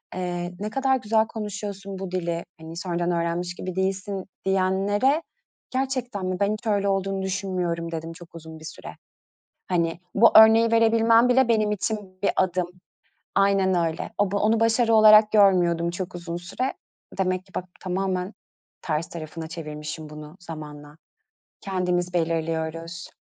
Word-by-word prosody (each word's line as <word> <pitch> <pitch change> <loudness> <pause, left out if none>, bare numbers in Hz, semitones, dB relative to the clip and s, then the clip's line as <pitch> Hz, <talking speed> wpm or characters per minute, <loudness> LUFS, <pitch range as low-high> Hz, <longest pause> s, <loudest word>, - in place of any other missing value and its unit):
Eee, 175 -1 -3
"Ne 210 +1 -3
kadar 265 +3 +1
güzel 220 -1 +1
konuşuyorsun 200 -3 -6
bu 190 -2 -5
dili, 170 -2 -2 0.2
hani, 160 +1 -9
sonradan 175 -1 -1
öğrenmiş 170 +1 -1
gibi 185 0 -6
değilsin." 190 0 -2 0.2
diyenlere 195 - +2 0.5
"Gerçekten 255 -6 -2
mi? 185 0 -1
Ben 200 0 +2
hiç 215 +2 -7
öyle 200 -2 +1
olduğunu 195 0 -1
düşünmüyorum." 180 -3 -2
dedim 165 0 -5
çok 170 0 -14
uzun 160 -1 -10
bir 155 - -12
süre. - - -9 0.7
Hani, 170 -2 0
bu 230 +3 +6
örneği 225 +1 +7
verebilmem 230 +1 +5
bile 255 0 +4
benim 215 -2 +2
için 200 -1 -4
bir 200 - +3
adım. 180 -1 +1 0.7
Aynen 195 -1 +3
öyle. 160 - -6
O 205 -2 +1
bu 200 - 0
onu 220 +2 +2
başarı 225 0 +3
olarak 215 0 +8
görmüyordum 175 -5 +4
çok 185 0 -5
uzun 170 -1 -5
süre 215 +9 -3 0.5
demek 185 -1 0
ki 190 - -24
bak, 185 - -3 0.2
tamamen 185 +1 -2 0.5
ters 155 0 -2
tarafına 160 -1 -7
çevirmişim 155 -1 -7
bunu 150 +1 -10
zamanla 150 -3 -9 0.7
kendimiz 180 -2 -1
belirliyoruz. 165 0 -2
185 Hz, 145 wpm, -25 LUFS, 170-210 Hz, 0.7 s, olarak